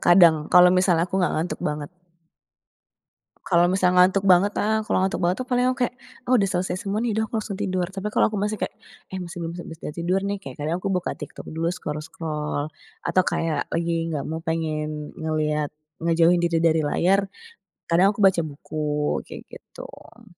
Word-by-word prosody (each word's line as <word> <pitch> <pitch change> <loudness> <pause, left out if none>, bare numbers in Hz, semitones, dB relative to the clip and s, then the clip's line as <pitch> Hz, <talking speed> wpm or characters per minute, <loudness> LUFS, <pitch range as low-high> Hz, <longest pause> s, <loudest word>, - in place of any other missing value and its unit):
kadang, 170 -4 +5
kalau 180 0 +7
misalnya 180 -2 +3
aku 180 - -7
nggak 180 - +1
ngantuk 165 +3 -2
banget. 150 -1 -3 1.6
Kalau 175 -1 +4
misalnya 180 -1 +2
ngantuk 195 +1 -1
banget, 190 +3 +4
ah, 220 +1 +2
kalau - - +1
ngantuk 190 0 -1
banget 180 +2 +2
tuh 250 - -13
paling 250 0 +2
aku 255 0 +1
kayak, 245 - -11 0.3
oh 255 - +4
udah 200 - +2
selesai 180 0 -1
semua 200 +2 -2
nih, 240 - 0
udah 220 - +1
aku 225 - -13
langsung 200 -3 -6
tidur. 185 -3 -1
Tapi 195 +2 -5
kalau - - +3
aku 210 - -3
masih 210 +2 -1
kayak, - - -2 0.4
eh 190 - -4
masih 180 0 -7
belum 165 - -4
bisa 175 - -7
bisa 160 0 -8
tidur 180 +3 0
nih, 200 0 -2
kayak 135 -4 -9
kadang 155 +3 -1
aku 195 - -3
buka 180 -1 -1
TikTok 150 - -9
dulu, 165 +1 -2
scroll-scroll. 155 -2 -4 0.3
Atau 185 - +2
kayak 160 -3 -1
lagi 170 0 0 0.2
nggak 145 - -2
mau 160 0 -3
pengen, 155 -2 -3
ngelihat 150 -2 -1 0.3
ngejauhin 170 +1 +4
diri 170 -1 +2
dari 160 -1 +3
layar, 195 +6 +2 0.6
kadang 180 +4 +4
aku 210 - -8
baca 190 -3 +4
buku, 155 0 -6 0.4
kayak - - -8
gitu. 230 +1 -13
175 Hz, 190 wpm, -24 LUFS, 160-195 Hz, 1.6 s, kalau